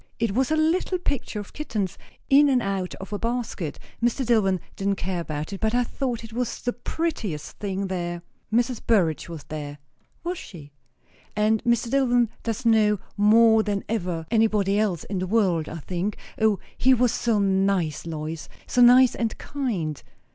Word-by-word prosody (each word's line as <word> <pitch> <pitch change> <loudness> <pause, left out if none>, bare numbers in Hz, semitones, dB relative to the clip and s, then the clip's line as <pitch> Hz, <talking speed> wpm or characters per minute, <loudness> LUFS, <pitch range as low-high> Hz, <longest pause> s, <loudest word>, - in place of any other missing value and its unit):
It 230 -3 0
was 260 +3 +1
a 315 - +2
little 330 +4 +1
picture 280 -10 -3
of 205 - -9
kittens, 215 - -3 0.3
in 285 +1 +6
and 260 -2 +4
out 195 -4 -2
of 195 +2 -9
a 205 - -2
basket. 230 -9 -3 0.3
Mr. 240 +2 +1
Dillwyn 205 -6 +3 0.2
didn't 200 0 0
care 185 -1 -3
about 155 +2 -4
it; 195 - -5
but 220 +1 0
I 245 - +3
thought 240 -1 -3
it 225 -1 -10
was 240 0 -2
the 245 - 0
prettiest 240 - -4
thing 195 -1 -2
there. 175 -2 -3 0.3
Mrs. 240 +1 +1
Burrage 170 -9 +1
was 165 -4 -7
there." 145 -1 -6 0.5
"Was 350 +1 -3
she?" 150 -6 -11 0.6
"And 215 +1 +2
Mr. 235 0 +2
Dillwyn 245 -4 +3
does 230 +2 -3
know 215 -2 +4 0.2
more 220 +2 +6
than 205 -2 -2
ever 180 -7 -2
anybody 210 -3 +2
else 195 -7 0
in 195 - -3
the 185 - -2
world, 185 -7 +1
I 165 - -6
think. 180 +5 -3 0.2
O, 215 -2 +4 0.2
he 260 +1 +4
was 245 -1 +3
so 230 -3 +1
nice, 190 -6 +1
Lois! 155 0 -5 0.2
so 250 - +1
nice 250 +1 +7
and 230 -2 -2
kind. 200 - -3
210 Hz, 175 wpm, -25 LUFS, 185-240 Hz, 0.6 s, nice